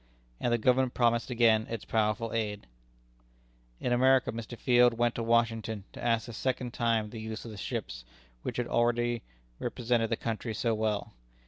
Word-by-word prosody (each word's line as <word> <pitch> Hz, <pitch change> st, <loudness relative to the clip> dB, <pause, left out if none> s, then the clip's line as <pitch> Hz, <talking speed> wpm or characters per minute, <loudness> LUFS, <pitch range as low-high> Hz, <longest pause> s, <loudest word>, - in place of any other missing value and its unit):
And 120 Hz, -, 0 dB
the 120 Hz, -, +3 dB
Government 125 Hz, +2 st, +2 dB
promised 120 Hz, 0 st, +2 dB
again 115 Hz, -3 st, +3 dB
its 115 Hz, -, -5 dB
powerful 110 Hz, 0 st, 0 dB
aid. 105 Hz, -3 st, -2 dB, 1.1 s
In 125 Hz, -, 0 dB
America, 130 Hz, +1 st, +4 dB
Mr. 115 Hz, +1 st, -7 dB
Field 120 Hz, -1 st, +4 dB
went 120 Hz, 0 st, +2 dB
to -, -, -3 dB
Washington 115 Hz, -2 st, +1 dB
to -, -, -9 dB
ask 115 Hz, 0 st, +1 dB
a 120 Hz, -, -7 dB
second 125 Hz, +1 st, -2 dB
time 115 Hz, -3 st, 0 dB
the 115 Hz, -, -7 dB
use 110 Hz, +1 st, -6 dB
of 115 Hz, -, -7 dB
the 105 Hz, -, -9 dB
ships, -, -, -4 dB, 0.4 s
which -, -, -4 dB
had 125 Hz, -, 0 dB
already 120 Hz, 0 st, +1 dB, 0.4 s
represented 115 Hz, -2 st, 0 dB
the 115 Hz, -, +1 dB
country 115 Hz, 0 st, -3 dB
so 115 Hz, +1 st, +1 dB
well. 110 Hz, -1 st, -1 dB
115 Hz, 170 wpm, -30 LUFS, 110-120 Hz, 1.1 s, America